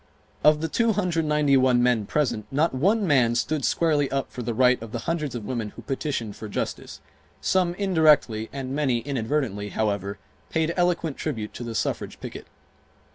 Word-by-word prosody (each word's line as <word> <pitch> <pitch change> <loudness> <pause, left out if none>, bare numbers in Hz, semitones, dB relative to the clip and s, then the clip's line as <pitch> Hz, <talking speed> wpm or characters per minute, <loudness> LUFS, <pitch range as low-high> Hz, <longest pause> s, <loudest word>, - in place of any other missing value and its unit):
Of 150 0 +5
the 160 - 0
291 150 - +2
men 120 -5 +2
present, 125 -8 -1
not 150 +4 +1
one 200 - +2
man 125 -8 +3
stood 145 +4 0
squarely 150 -3 +2
up 135 -2 -2
for 125 - -6
the 120 -1 -3
right 125 0 +4
of 115 -1 -9
the 120 - -3
hundreds 155 -6 -2
of 115 -3 -5
women 115 -3 -3
who - - -10
petitioned 135 -6 -3
for 110 - -8
justice. - - -4 0.4
Some 180 -2 +1
indirectly 155 - +3
and 135 -1 -5
many, 135 -5 +1
inadvertently, 115 -6 -2
however, 100 -2 -2 0.3
paid 160 +1 0
eloquent 175 -4 0
tribute 110 -9 -4
to - - -7
the 115 -1 -5
suffrage - - -2
picket. - - -8
135 Hz, 165 wpm, -25 LUFS, 115-155 Hz, 0.4 s, Of